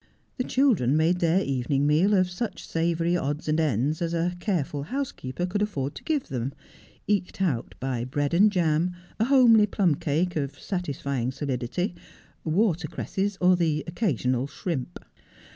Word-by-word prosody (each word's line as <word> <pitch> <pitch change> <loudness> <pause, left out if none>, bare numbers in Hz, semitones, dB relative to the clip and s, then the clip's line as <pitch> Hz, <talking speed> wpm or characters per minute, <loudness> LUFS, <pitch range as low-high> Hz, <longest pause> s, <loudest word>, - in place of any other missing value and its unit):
The - - +2
children 220 - +2
made 170 +3 +2
their 175 +3 +3
evening 135 +1 0
meal 165 +8 +4
of 185 -1 +3
such 180 +6 -5
savoury 170 +1 0
odds 150 -2 -2
and 155 +1 +2
ends 150 +1 0
as 170 0 -1
a 170 +2 0
careful 165 -8 -1
house 265 - -3
keeper 130 +7 -4
could 190 +3 -2
afford 145 -10 -2
to - - -10
give 300 -4 -1
them, 130 +1 -3 0.5
eked 200 -3 0
out 155 -12 -1
by 125 -2 -2
bread 145 +3 -1
and 205 +5 +5
jam, 175 -1 +1 0.2
a 220 - +3
homely 240 -5 +6
plum 190 -5 +2
cake, 160 +5 -1
of 145 -2 -3
satisfying 140 - -2
solidity, 135 - -2 0.5
water 175 0 +1
cresses, 195 +4 -3
or 180 0 +5
the 160 -4 0
occasional 135 - 0
shrimp. 140 -2 -5
165 Hz, 160 wpm, -26 LUFS, 140-185 Hz, 0.5 s, homely